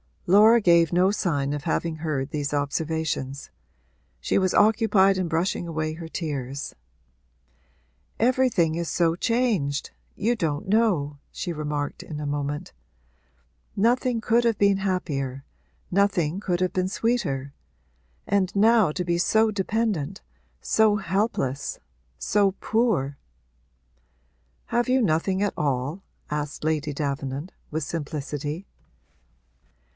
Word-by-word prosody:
Laura 215 +5 +6
gave 170 -3 +4
no 185 +2 +4
sign 145 -9 -1
of 145 -1 -4
having 165 -1 -1
heard 150 -4 -2
these 145 -2 -2
observations; 145 -2 -2 0.7
she - - 0
was 185 -1 +2
occupied 205 -3 +4
in 185 -2 -1
brushing 170 +1 -1
away 155 -1 -2
her 165 +1 -8
tears. 140 -5 -4 1.4
'Everything 230 -9 +2
is 170 0 -2
so 165 -1 +1
changed 200 - 0 0.2
you 225 +4 +1
don't 155 -8 -2
know,' 180 -10 +2
she 180 - -4
remarked 150 -2 -3
in 150 -2 -7
a 150 - -4
moment. 145 0 -3 1.0
'Nothing 240 +2 +2
could 235 +2 +2
have 230 -3 +2
been 200 -1 +4
happier 145 -9 -2 0.5
nothing 185 -3 +1
could 180 -3 -1
have 185 - +1
been 185 0 0
sweeter. 185 - -1 0.7
And 200 -1 0
now 215 -4 +4
to 180 - -2
be 170 0 0
so 220 +4 +3
dependent 200 -3 -1 0.4
so 220 -1 +3
helpless 190 - -1 0.4
so 200 -1 +2
poor!' 195 - 0 1.5
'Have 240 +1 +1
you 260 +1 +3
nothing 185 +1 +1
at 205 - 0
all?' 140 +5 -1 0.3
asked 150 -1 -3
Lady 155 -1 0
Davenant, 140 +3 -3 0.2
with 155 0 -2
simplicity. 150 +2 -4
170 Hz, 120 wpm, -25 LUFS, 145-205 Hz, 1.5 s, Laura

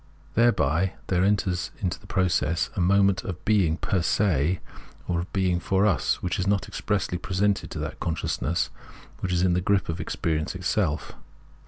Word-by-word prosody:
Thereby 95 - +2 0.2
there 90 -1 +2
enters 95 -3 +1
into 90 -5 -1
its - - -19
process 85 -3 +1
a - - 0
moment 100 +2 +3
of 90 -2 -6
being 95 -7 +3
per 95 -1 0
se 85 -3 +2 0.5
or 85 -1 0
of 85 - -5
beiag 90 -3 +1
for 95 +1 +2
us, 100 - +1
which 90 0 -1
is 95 - 0
not 100 -1 +1
expressly 95 -4 -2
presented 100 +2 0
to - - -6
that - - -5
consciousness 85 0 -1 0.5
which 95 - -2
is 90 0 +2
in 90 -1 +3
the 90 - +1
grip 95 0 +1
of 80 - -2
experience 80 +1 -2
itself. 90 -4 -1
90 Hz, 170 wpm, -26 LUFS, 85-100 Hz, 0.5 s, moment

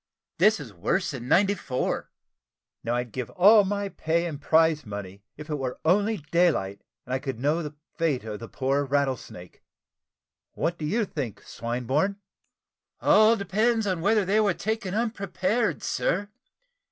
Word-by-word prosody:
This 210 +3 +5
is 125 -8 -9
worst 155 - -1
than 125 -3 -7
'94." 185 -7 +1 0.7
"Now 120 +1 -1
I'd 120 -1 -3
give 125 +1 -4
all 205 +3 +6
my 200 +1 -2
pay 170 -2 -1
and 150 -4 -5
prize 160 -1 +3
money, 100 -2 -7 0.2
if 150 0 -9
it 150 -2 -3
were 130 -2 -4
only 205 +6 +3
daylight 155 - +2 0.2
and 125 - -5
I 130 - +1
could 135 -4 -5
know 150 +6 +1
the 150 -2 -6 0.2
fate 155 -8 +1
of 105 -2 -6
the 115 - -8
poor 135 +3 0
Rattlesnake. 135 -10 -3 0.9
What 170 +1 -2
do 155 - -3
you 215 +8 +1
think, 140 - -5
Swinburne?" 125 - -1 0.8
"All 215 +2 +5
depends 220 +3 +1
upon 185 -4 -1
whether 205 +2 +3
they 205 +4 +2
were 205 -5 +2
taken 215 -3 -3
unprepared, 220 -1 -1
sir. 200 +3 -1
165 Hz, 155 wpm, -26 LUFS, 130-200 Hz, 0.9 s, all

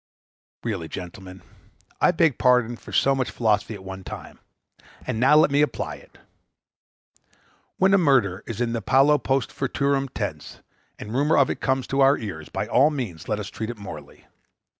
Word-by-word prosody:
Really, 80 - -3
gentlemen, 90 +2 -9 0.6
I - - +5
beg 160 -5 +2
pardon 125 -2 +3
for - - -13
so 135 - +3
much 130 -2 -1
philosophy 110 -1 0
at 95 - -11
one 95 0 -8
time, - - -9 0.7
and 110 - -3
now 135 +5 +5
let 155 -2 +5
me 145 +1 +3
apply 150 - -2
it. - - -20 1.6
When 190 +1 +3
a 195 - +6
murder 120 - +2
is 115 -2 -5
in 120 -1 -1
the 115 - -2
paulo 135 +6 +4
post 135 +2 -1
futurum 140 0 -1
tense, - - -6 0.4
and 105 - -8
a - - -5
rumor 145 +5 +2
of 140 - +4
it - - -6
comes 130 -1 0
to 135 0 0
our 135 +1 +5
ears, 85 -9 -7
by - - -3
all 140 +4 +4
means 115 - -5
let 105 - -1
us 105 -1 -6
treat 110 0 -5
it 120 - -6
morally. 80 -8 -10
125 Hz, 185 wpm, -24 LUFS, 100-140 Hz, 1.6 s, a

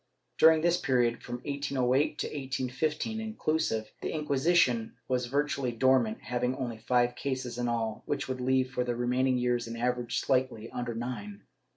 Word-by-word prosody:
Dur 160 - +9
ing 160 - 0
this 175 +1 +3
period, 120 -3 +2
from - - -5
1808 140 0 +1
to - - -2
1815, 145 - -2
inclusive, 155 - -1
the - - -2
Inquisition 145 -5 +2
was 125 -1 0
virtually 140 -1 0
dormant, 120 -2 +2
having 125 +3 -1
only 120 -4 -4
five 120 +1 +2
cases 130 -2 -3
in 120 - 0
all, 115 -2 -1
which 145 - -1
would 130 -1 -3
leave, 130 0 +2
for 125 -1 0
the 120 -1 -2
remaining 125 +2 +1
years, 120 -1 0
an 115 0 -6
average 120 0 -1
slightly 130 -4 0
under 120 -1 -3
nine. 105 -4 -5
125 Hz, 165 wpm, -30 LUFS, 120-140 Hz, -, Dur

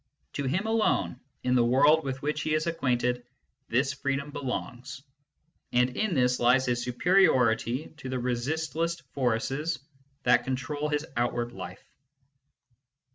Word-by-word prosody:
To 140 - -2
him 185 +11 0
alone, 215 - +1 0.2
in 125 - +1
the 125 -2 +4
world 145 +6 +5
with 135 0 -4
which 150 0 -1
he 155 +1 0
is 155 +1 0
acquainted, 125 -6 0 0.4
this 135 +4 +1
freedom 140 +1 -2
belongs; 130 0 -5 0.7
and 125 +1 +2
in 215 -5 0
this 125 -1 +2
lies 125 +2 +4
his 120 -1 0
superiority 125 - +2
to 130 -3 -7
the 130 - -1
resistless 155 +7 -1
forces 135 +5 0 0.5
that 125 0 +4
control 145 +3 -2
his 150 +1 -1
out 120 +1 +1
ward 120 0 -2
life. - - -9
130 Hz, 135 wpm, -28 LUFS, 125-150 Hz, 0.7 s, world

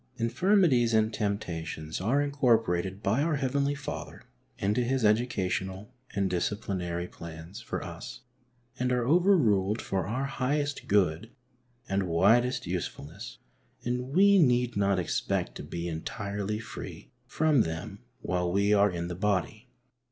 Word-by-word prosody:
23 115 - 0
Infirmities 130 - +3
and 110 0 +2
temptations 85 -7 -3
are 130 +9 +2
incorporated 110 -9 +1
by 110 +8 +2
oui 160 -2 +1
Heavenly 140 +1 0
Father 140 - -7 0.3
into 105 +5 +1
His 125 -1 +1
educational 105 -1 0 0.2
and 100 -1 +1
disciplinary 90 -2 -2
plana 80 +1 -10
for - - -4
us - - -8 0.6
and 125 0 +1
are 125 -1 +1
overruled 125 - +3
for 95 -3 -2
our 125 +6 -1
highest 140 +2 -2
good 100 +1 +2 0.6
and 95 -1 0
widest 110 +10 +3
usefulness, 85 -4 -5 0.5
and 125 +1 -1
we 200 +1 +6
need 125 -5 +3
not 100 -1 +2
expect 90 -3 -1
to - - -7
be 85 0 -5
entirely 100 +4 -3
free 115 +1 -8 0.2
from 155 -5 +3
them 80 -2 -4 0.2
while 90 -1 0
we 100 +2 +3
are 100 0 +5
in 85 -2 -3
the 90 - -4
body. 95 -1 -1
105 Hz, 135 wpm, -29 LUFS, 90-125 Hz, 0.6 s, we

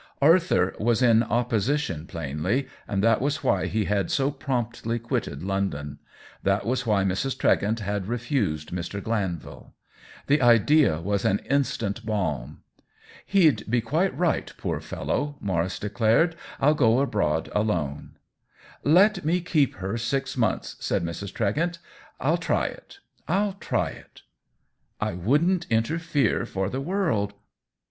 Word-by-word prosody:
Arthur 160 - +4
was 115 +3 +2
in 115 -2 +5
opposition, 120 - 0
plainly, 85 - -2 0.2
and 100 -1 -1
that 115 0 +4
was 145 +3 -1
why - - +1
he 110 -2 0
had 100 0 0
so 140 0 +1
promptly 120 -5 -2
quitted 115 - -3
London; 80 -7 -2 0.4
that 100 +1 +1
was 125 0 -1
why 105 -3 +3
Mrs. 95 +8 -1
Tregent 110 +3 +2
had 100 -1 -2
re 120 +2 -1
fused 100 - -2
Mr. 90 +3 -4
Glanvil. 100 -6 -4 0.5
The 145 +1 +3
idea 120 - +5
was 100 +3 -1
an 100 - +3
instant 115 -6 0
balm. 80 - -3 0.3
" - - -41 0.3
He'd 155 - +3
be 120 +2 +3
quite 155 - 0
right, 175 -2 0
poor - - -2
fellow 145 0 -3
!" - - -29
Maurice 95 -2 -1
declared. 115 - +2
" - - -15
Til 150 +3 +4
go 120 -4 +3
abroad 100 - 0
alone." 85 -10 -2 0.4
" - - -29 0.2
Let 190 +5 +4
me 170 +4 +2
keep 155 -6 +1
her 95 +5 -3
six 135 +4 -2
months," 115 -6 -1
said - - -1
Mrs. 85 +4 -5
Tregent. 160 - -1 0.2
" - - -26
I'll - - +2
try - - 0
it— - - -8 0.3
I'll 195 +4 +1
try 195 - -1
it - - -15 0.3
!" - - -48
" - - -47
I - - -1
wouldn't 150 - +1
interfere 140 +3 +1
for 95 0 -2
the 130 - -3
world." 135 - 0
115 Hz, 155 wpm, -25 LUFS, 95-140 Hz, 0.5 s, in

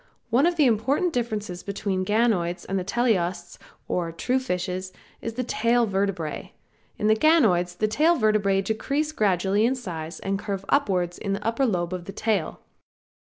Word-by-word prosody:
One 265 +8 +4
of 350 - +1
the 305 -3 +4
important 265 - +1
differences 215 -7 -3
between 200 -1 -3
the 185 - -2
ganoids 205 -6 +1
and 195 0 -1
the - - -3
teleosts 185 -5 -1 0.3
or 170 -2 -1
true 250 +10 0
fishes 185 -5 -3 0.3
is 230 - -4
in - - -21
the 255 - -1
tail 235 0 +2
vertebrae. 195 -6 -2 0.4
In - - -2
the 215 - +5
ganoids 215 - +3
the 215 - +1
tail 305 +11 +3
vertebrae 210 -4 +2
decrease 275 +9 -1
gradually 200 - +1
in 250 +3 +2
size 170 -9 -6
and 195 0 -2
curve 195 -2 -4
upwards 185 -10 +1
in 200 -2 -2
the 205 +1 -4
upper 235 +4 +1
lobe 175 -4 -1
of 180 -1 -5
the 195 - -7
tail. 210 -6 -1
205 Hz, 175 wpm, -25 LUFS, 185-240 Hz, 0.4 s, the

